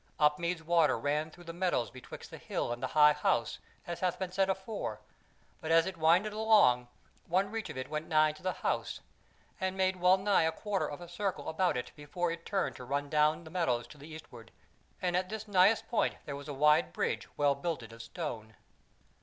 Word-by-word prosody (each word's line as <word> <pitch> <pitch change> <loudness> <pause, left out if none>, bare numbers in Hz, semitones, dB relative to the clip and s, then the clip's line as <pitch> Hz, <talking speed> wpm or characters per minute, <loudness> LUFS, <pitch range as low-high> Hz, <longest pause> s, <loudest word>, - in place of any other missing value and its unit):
Upmeads 160 +3 +1
water 165 -4 +3
ran 150 +2 -1
through 175 +2 -15
the 165 -1 -7
meadows 175 - 0
betwixt 130 0 -11
the - - -9
hill 120 - -2
and 120 - -8
the 130 - -1
High 150 0 +8
House, - - 0 0.3
as 170 -1 -5
hath 180 -1 0
been 185 -1 -4
said 195 +1 +1
afore; 190 - -3 0.6
but 160 - -6
as 165 0 +5
it 190 - -4
winded 175 +6 +3
along, 210 - +4 0.4
one 190 +4 +1
reach 225 -1 -4
of - - -7
it 130 0 -4
went 155 +1 -4
nigh 155 -1 +4
to 155 - -15
the 185 - 0
House, - - -1 0.6
and 190 0 -2
made 190 0 +1
wellnigh 190 +3 +4
a - - +1
quarter 200 +3 -2
of 145 +4 -7
a 175 - -8
circle 190 +2 -3
about 175 -2 +1
it 125 0 -5
before 165 +4 -2
it 170 0 -7
turned 195 -2 -1
to - - -9
run 140 +3 -2
down 155 +2 +3
the 160 - -12
meadows 125 -10 0
to 150 - -14
the 145 - -11
eastward; 125 -8 -11 0.5
and 175 -1 +1
at 185 0 0
this 220 0 -5
nighest 200 +2 +4
point 235 - +1
was 140 0 -6
there 145 - -5
a - - -11
wide 150 - +4
bridge - - -1
well 145 -1 +3
builded 140 -6 -4
of 115 - -10
stone. 115 -5 -6
165 Hz, 210 wpm, -31 LUFS, 145-185 Hz, 0.6 s, High